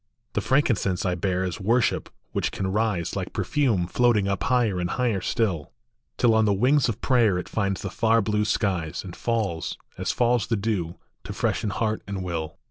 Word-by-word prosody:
The - - 0
frankincense 115 -10 +1
I 90 - +1
bear 90 +1 -1
is 90 -2 -3
worship 115 +5 +1 0.2
which - - -1
can 95 - -3
rise, 105 -5 0
Like - - -4
perfume 120 -12 +1
floating 110 +1 +2
up 100 -1 -1
higher 120 -7 +2
and 90 0 -1
higher 120 -7 0
still, 90 -10 -1 0.4
Till 120 -2 +4
on 110 0 +4
the 105 - +3
wings 125 +7 +3
of 115 0 -4
prayer 115 -8 +3
it 90 - -4
finds 100 -3 -1
the 100 - -4
far 115 +1 +3
blue 105 0 +1
skies, 90 -6 -1
And 90 -3 -8
falls, 105 -9 -2 0.2
as - - 0
falls 120 -2 +2
the 115 - +1
dew, 100 -5 -2 0.3
to - - -5
freshen 105 - -1
heart 110 +2 -1
and 100 -2 -4
will. 85 -3 -4
105 Hz, 190 wpm, -25 LUFS, 90-115 Hz, 0.4 s, Till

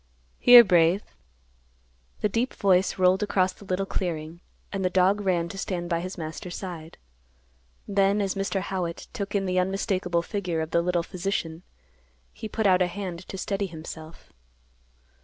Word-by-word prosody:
"Here, 245 -1 +10
Brave." 180 0 +3 1.2
The - - +3
deep 230 +5 -1
voice 190 -1 +2
rolled 185 +1 +3
across 190 -3 +1
the 200 - -15
little 185 +1 -1
clearing, 170 -3 -4 0.3
and 195 -1 -2
the 185 - +2
dog 190 +3 +3
ran 180 -4 +1
to 195 +1 -7
stand 175 -3 -3
by 170 - +1
his 185 +3 -6
master's 165 +2 -6
side. 170 -4 -7 0.9
Then, 200 0 +2
as 195 -2 0
Mr. 195 0 -2
Howitt 180 -3 -4
took 200 0 -4
in 195 -1 +1
the 185 0 +1
unmistakable 185 -2 0
figure 180 -4 -3
of 160 0 -4
the 170 - +3
little 175 0 0
physician, 175 -3 -3 0.7
he 220 - -7
put 220 +1 -2
out 185 -2 +5
a 180 - +3
hand 180 -1 -6
to 195 - -7
steady 195 +1 -2
himself. 160 -1 -10
185 Hz, 160 wpm, -26 LUFS, 170-195 Hz, 1.2 s, Here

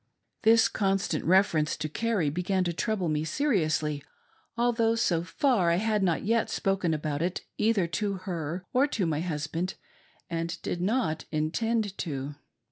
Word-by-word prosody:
This 225 0 +6
constant 195 -5 0
reference 170 -4 +3
to 155 - -2
Carrie 195 -3 0
began 185 +3 0
to 175 -1 -1
trouble 200 0 -1
me 155 -1 0
se 210 - -2
riously, 155 - +1 0.6
although, 230 -1 +2
so 175 -7 +1
far, 205 - +2
I 170 - +3
had 215 +2 +1
not 175 -4 +1
yet 230 +1 +2
spoken 195 -4 0
about 150 -1 -2
it 175 +2 -1 0.2
either 215 -4 +3
to 200 +5 -1
her 180 -2 -4
or 265 +3 +4
to 220 -9 -1
my 155 -2 0
husband, 165 +2 -3 0.5
and 165 0 -3
did 175 - -2
not 190 -6 0
intend 205 +7 0
to. 140 -4 -3
180 Hz, 155 wpm, -28 LUFS, 160-215 Hz, 0.6 s, This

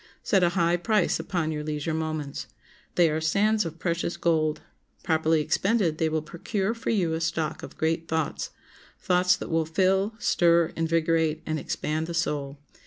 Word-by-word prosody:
Set 195 -3 +3
a 175 - +4
high 170 0 +3
price 185 +1 +1
upon 170 -5 -2
your 150 -1 -3
leisure 150 +1 -2
moments. 155 -3 -3 0.5
They 175 -1 +5
are 155 +1 -1
sands 205 +6 +2
of 165 0 -8
precious 170 0 -2
gold; 155 -2 +1 0.4
properly 160 -1 +2
expended 190 -1 +1
they 160 - +2
will 155 -1 -1
procure 190 +6 -2
for 230 - -5
you 185 -8 +1
a 160 - -2
stock 165 -1 -2
of - - -10
great 165 +1 0
thoughts—thoughts 180 +3 -1
that - - -7
will 160 -1 +1
fill, 190 +5 +1
stir, 170 -6 +3
invigorate, 165 -1 +1
and 155 0 -2
expand 155 +2 -2
the 170 - -4
soul. 145 -4 -2
165 Hz, 165 wpm, -26 LUFS, 155-180 Hz, 0.5 s, They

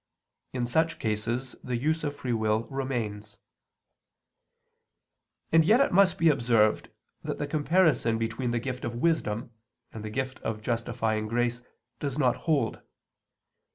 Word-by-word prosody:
In 125 -2 -1
such 160 +7 +1
cases 115 +4 -2
the 125 -1 -2
use 155 +6 0
of 145 -1 -2
free 130 -4 -3
will 110 0 +1
remains. 110 -6 -3 2.1
And 165 0 +6
yet 215 +9 +5
it 275 - +3
must 190 0 +4
be 165 - +3
observed 115 -6 +2 0.3
that - - -4
the 145 - -2
comparison 150 -5 +2
between 115 +2 -2
the 120 - 0
gift 125 +1 -4
of 120 0 -3
wisdom 120 -5 0 0.4
and 110 - -7
the 110 - -4
gift 130 +3 -3
of 110 -1 -4
justifying 110 -2 -1
grace 120 +1 0 0.4
does 140 -2 -3
not 130 -5 +3
hold. 150 -3 +1
120 Hz, 140 wpm, -28 LUFS, 115-145 Hz, 2.1 s, And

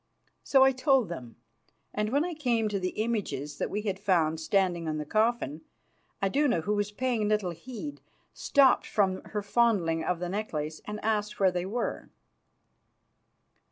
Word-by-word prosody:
So 270 -1 +5
I 265 - +6
told 260 - +2
them, 125 -9 -7 0.6
and 210 0 -1
when 285 +7 +2
I 355 - -3
came 240 -8 0
to 200 -1 -1
the 185 +3 -2
images 200 - -3
that - - -1
we 210 +1 -3
had 195 -3 -2
found 165 -6 +2
standing 175 -1 +1
on 155 -1 -1
the 150 - -4
coffin, 215 - 0 0.6
Iduna, 250 - +2
who 205 +6 -1
was 205 0 -1
paying 235 -2 0
little 210 -4 +1
heed, 170 - -8 0.3
stopped 270 -3 +4
from 190 -3 +1
her 210 -1 -4
fondling 200 -7 +2
of 180 - 0
the 175 +1 -4
necklace 160 -6 -3
and 210 0 -5
asked 210 -1 -1
where 190 -2 +4
they 180 0 -2
were. 235 +5 -3
205 Hz, 160 wpm, -29 LUFS, 175-235 Hz, 0.6 s, I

